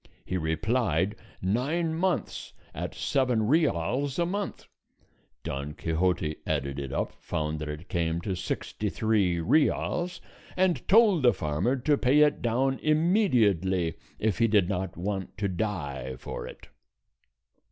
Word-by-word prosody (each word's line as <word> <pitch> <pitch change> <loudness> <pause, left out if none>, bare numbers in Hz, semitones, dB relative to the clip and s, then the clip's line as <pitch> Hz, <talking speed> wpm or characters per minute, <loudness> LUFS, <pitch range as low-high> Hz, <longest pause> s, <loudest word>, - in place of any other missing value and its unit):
He 95 - -3
replied, 95 +3 0 0.3
nine 145 - 0
months 175 +1 -2 0.2
at - - -5
seven 125 -5 +1
reals 135 - +1
a 170 - +2
month. 200 +2 -4 0.8
Don 70 +2 -4
Quixote 80 -1 0
added 70 -2 -1
it 70 -2 -5
up, - - -1
found 75 0 -2
that 75 0 -5
it 75 +3 -7
came 85 -1 -1
to 95 +1 -2
sixty 95 +3 -3
three 100 -6 +1
reals, 175 - +1 0.4
and 185 -2 +1
told 205 -5 +6
the 125 -2 +5
farmer 75 - 0
to 140 +3 +1
pay 140 +4 +4
it 150 -1 +3
down 130 +3 +1
immediately 115 - +2 0.2
if 110 -4 0
he 115 - +4
did 105 -5 +3
not 95 -3 -3
want 95 +2 -4
to 105 -1 0
die 80 -10 -3
for - - -6
it. - - -12
105 Hz, 135 wpm, -28 LUFS, -, 0.8 s, told